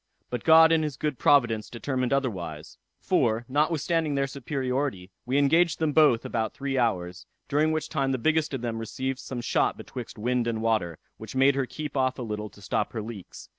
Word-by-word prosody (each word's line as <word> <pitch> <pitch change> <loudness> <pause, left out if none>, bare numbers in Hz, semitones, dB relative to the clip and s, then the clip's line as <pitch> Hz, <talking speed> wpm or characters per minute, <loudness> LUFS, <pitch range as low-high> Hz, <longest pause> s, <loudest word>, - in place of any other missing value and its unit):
But 125 -2 -3
God 160 0 +7
in 165 -1 +4
his 150 -4 -3
good 150 -5 -2
providence 120 -7 +3
determined 130 +1 -2
otherwise; 90 - -3 0.2
for, 115 +1 +1
notwithstanding 155 +2 0
their 140 0 +1
superiority, 130 -7 -3 0.2
we 130 +3 +1
engaged 160 +4 +3
them 155 -2 0
both 145 -7 +4
about 110 -1 -2
three 140 -1 -3
hours; 90 -7 -1 0.2
during 150 +2 +2
which 155 -1 -1
time 135 -3 -1
the 130 - 0
biggest 160 +4 +1
of 130 - -5
them 115 -2 -3
received 130 +4 -4
some 125 -3 -5
shot - - +1
betwixt 125 -3 -8
wind 120 +2 0
and 115 -1 -2
water, 105 -8 0 0.2
which 110 +3 -9
made 135 +1 +5
her 135 -2 -1
keep 150 +1 -6
off 130 -1 +1
a 125 - -4
little 105 -1 -4
to 100 - -17
stop - - -1
her 110 - -3
leaks. 105 -4 -9
130 Hz, 195 wpm, -26 LUFS, 115-145 Hz, 0.2 s, God